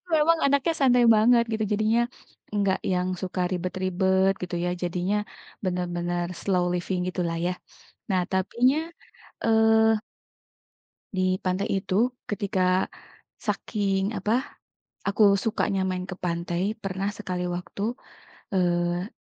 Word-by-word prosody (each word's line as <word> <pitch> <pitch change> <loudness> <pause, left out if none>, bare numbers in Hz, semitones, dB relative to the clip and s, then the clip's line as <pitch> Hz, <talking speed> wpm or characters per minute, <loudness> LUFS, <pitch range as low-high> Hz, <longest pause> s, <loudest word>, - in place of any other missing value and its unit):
Memang 325 +2 +4
anaknya 280 +4 +2
santai 250 -2 +5
banget 235 +2 +5
gitu 220 0 0
jadinya, 220 +3 +2 0.5
enggak 200 -2 +1
yang 180 0 0
suka 185 0 -2
ribet-ribet 185 +1 +1
gitu 180 0 -3
ya - - +1
jadinya, 180 +3 0 0.5
bener-bener 175 -1 -1 0.2
slow 180 -3 +1
living 180 +1 -1
gitu 180 - -3
lah 165 - -2
ya. 180 - +1 0.6
Nah, 185 -1 +3
tapinya, 235 +8 +2 0.7
eee 220 -1 +4 1.2
di 185 0 +1
pantai 185 +3 -1
itu 185 - -4 0.4
ketika, 200 -3 -1 0.8
saking 200 -1 0
apa? 210 +3 -1 0.8
Aku 200 +2 +2 0.2
sukanya 210 -3 0
main 185 0 -3
ke 185 - -6
pantai 170 0 -1 0.2
pernah 195 0 -2
sekali 180 -4 -3
waktu, 180 +3 -6 0.7
eee 175 0 +1
190 Hz, 115 wpm, -26 LUFS, 180-215 Hz, 1.2 s, santai